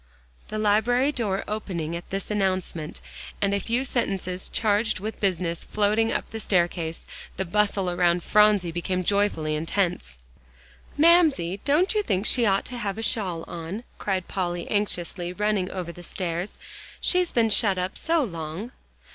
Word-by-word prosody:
The 215 - -4
library 225 +6 +3
door 210 -8 -1
opening 175 -6 -3
at 170 - -7
this 195 +2 -4
announcement, 185 -5 -1 0.4
and 200 -1 +1
a 200 - +2
few 235 +5 0
sentences 190 -8 -2
charged 215 0 +1
with 215 +3 -5
business 180 -4 0
floating 215 +2 +1
up - - -1
the 225 - -5
staircase, 170 -4 0 0.3
the 190 - -1
bustle 200 +1 +1
around 175 -1 +2
Phronsie 210 -4 +4
became 180 +2 -2
joyfully 200 -6 +1
intense. 165 - -1 0.8
"Mamsie, 295 - +4
don't 310 +9 +3
you 425 - +2
think 195 - -1
she 235 -1 +3
ought 195 -1 +2
to 250 - -5
have 200 -3 -2
a 225 - -3
shawl 190 -8 0
on?" 175 +7 -6 0.2
cried 190 -3 -1
Polly 175 -2 -2
anxiously, 180 -4 -1
running 205 -1 0
over 180 -2 -4
the 175 - -11
stairs. 175 +1 -4 0.4
"She's 360 -1 +2
been 225 -2 +2
shut 200 -2 +3
up 180 +2 -2
so 325 -1 +1
long!" 170 +2 -5
195 Hz, 155 wpm, -25 LUFS, 175-215 Hz, 0.8 s, Phronsie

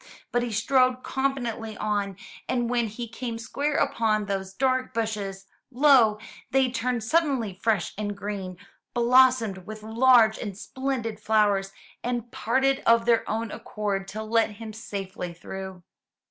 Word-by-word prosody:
But 245 - +2
he 240 -1 -3
strode 255 +3 +2
confidently 240 -5 -2
on, 205 -3 -1 0.3
and 240 -1 0
when 240 -2 +1
he 235 +3 -6
came 230 +1 -5
square 280 +6 -2
upon 215 -5 +1
those 195 -1 -3
dark 255 +3 0
bushes, 205 -4 -3 0.2
lo! 250 -5 +5 0.3
they 265 -1 +2
turned 245 -1 -1
suddenly 265 - +1
fresh 200 -1 0
and 205 -1 -3
green, 195 -3 -5 0.4
blossomed 240 -5 +4
with 215 0 -8
large 225 0 +5
and 200 -4 -5
splendid 250 -3 -3
flowers, 205 -3 +2 0.3
and 240 -1 -3
parted 265 +4 +1
of 230 0 +5
their 230 -1 +2
own 225 0 -2
accord 200 -2 -3
to 215 +2 -5
let 225 0 +1
him 220 +1 -8
safely 195 -5 -6
through. 190 +1 -8
225 Hz, 140 wpm, -26 LUFS, 205-250 Hz, 0.4 s, lo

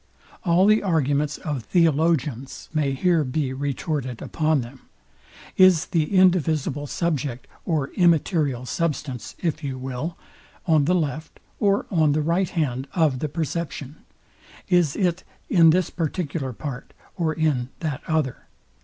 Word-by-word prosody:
All 180 0 +4
the 215 +1 +5
arguments 150 -5 +1
of 145 -5 -4
Theologians 150 - +1
may 145 -3 +1
here 165 +3 +2
be 130 0 -2
retorted 140 -2 -3
upon 155 -3 0
them. 125 +2 -12 0.7
Is 185 -4 +6
the 165 +2 0
indivisible 155 -6 +2
subject, 140 -7 -2 0.2
or 150 -5 0
immaterial 155 -7 +2
substance, 145 -5 -3
if 160 -3 -2
you 135 -2 -3
will, 135 +6 -5 0.5
on 155 -4 +3
the 180 +4 +2
left 155 -2 -3 0.2
or 200 -1 +2
on 155 -5 +3
the 155 0 +1
right 170 +3 +1
hand 135 -5 -2
of 155 -7 +2
the 155 - -2
perception? 155 -2 -4 0.7
Is 175 -5 +3
it 180 -2 0 0.3
in 165 -4 +7
this 180 +2 +2
particular 160 -4 -3
part, 135 +1 -7 0.2
or 165 -4 0
in 150 -6 0
that 150 -3 -3
other? 155 -5 -1
155 Hz, 135 wpm, -24 LUFS, 135-170 Hz, 0.7 s, in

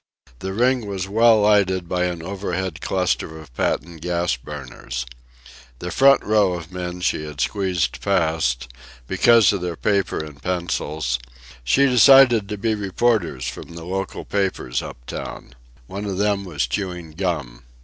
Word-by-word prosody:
The 95 - -4
ring 120 +2 +1
was 95 -2 -3
well 110 +2 +5
lighted 95 -4 +3
by 90 +1 0
an 85 -2 -3
overhead 95 -2 -4
cluster 90 -4 -1
of 75 -5 -13
patent 85 +5 -2
gas 85 -2 0
burners. 65 -2 -7 0.7
The 90 +6 -5
front 135 +6 +5
row 105 -3 +3
of 85 -2 -6
the - - -12
men 90 0 -5
she 85 - 0
had 75 -2 -8
squeezed 90 - -1
past, 80 -10 0 0.4
because 115 - +5
of 100 - -2
their 90 -1 -3
paper 100 0 0
and 75 -2 -7
pencils, 80 -7 -2 0.4
she 135 - +4
decided 125 -4 +6
to 105 - -3
be 110 +2 0
reporters 100 - 0
from 85 +6 -7
the 85 -1 -8
local 95 +2 -4
papers 95 -11 -1
up - - -10
town. - - -7 0.3
One 100 +9 -6
of 95 -2 -3
them 100 -1 +1
was 75 -8 -1
chewing 90 +2 -4
gum. 75 -9 -3
90 Hz, 155 wpm, -22 LUFS, 80-100 Hz, 0.7 s, decided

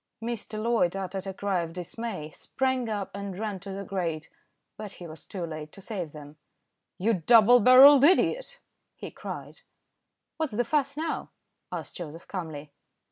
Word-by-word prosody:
Mr. 230 -2 -5
Loyd 220 -6 +1
uttered 195 0 -4
a 190 - -4
cry 195 -3 0
of 165 -1 -6
dismay, 180 -2 -5
sprang 260 - -2
up 205 -3 -3
and 200 -2 -6
ran 210 -2 -3
to 195 +2 -8
the 195 +1 -5
grate, 170 -5 -3 0.4
but 210 -2 -8
he 175 - -10
was 160 -1 -11
too 180 -4 -4
late 155 -2 -7
to - - -12
save 185 -6 -5
them. 150 0 -12 0.6
"You 220 +5 +2
double 225 +6 +6
barrelled 260 +4 +9
idiot!" - - +3 0.3
he - - -8
cried. - - -8 0.8
"What's 315 -7 -2
the 240 - +2
fuss 280 +1 0
now?" 320 +1 -3 0.4
asked - - -6
Joseph 165 -1 -8
calmly. 155 -6 -6
200 Hz, 160 wpm, -27 LUFS, 170-235 Hz, 0.8 s, barrelled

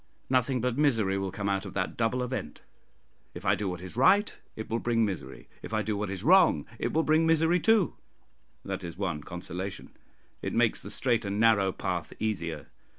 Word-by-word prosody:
Nothing 130 -1 +2
but 125 +2 -1
misery 110 -10 +2
will 95 0 -2
come 100 +1 -4
out 95 -1 0
of - - -9
that 95 -2 -2
double 120 +2 0
event: 125 - -5 0.7
if - - -8
I 100 - +4
do 100 0 -2
what 90 -1 -5
is 95 - -9
right, 190 - +4 0.2
it 110 - -6
will 115 - -1
bring 115 -2 +1
misery; 90 -10 -6
if 110 - -5
I 110 - +1
do 105 +1 -2
what 105 -1 -3
is 95 0 -5
wrong, 165 - +5
it - - -1
will 160 - +2
bring 160 +1 +3
misery 165 +2 +3
too, 220 -3 +3 0.7
that 95 -1 -4
is 85 -1 -7
one 85 -7 -2
consolation 90 +3 -6 0.5
it - - -3
makes - - +2
the - - -8
straight 120 -3 +1
and 100 +1 -2
narrow 110 -4 +4
path 90 -4 -4
easier. 90 -7 -3
105 Hz, 200 wpm, -28 LUFS, 95-125 Hz, 0.7 s, wrong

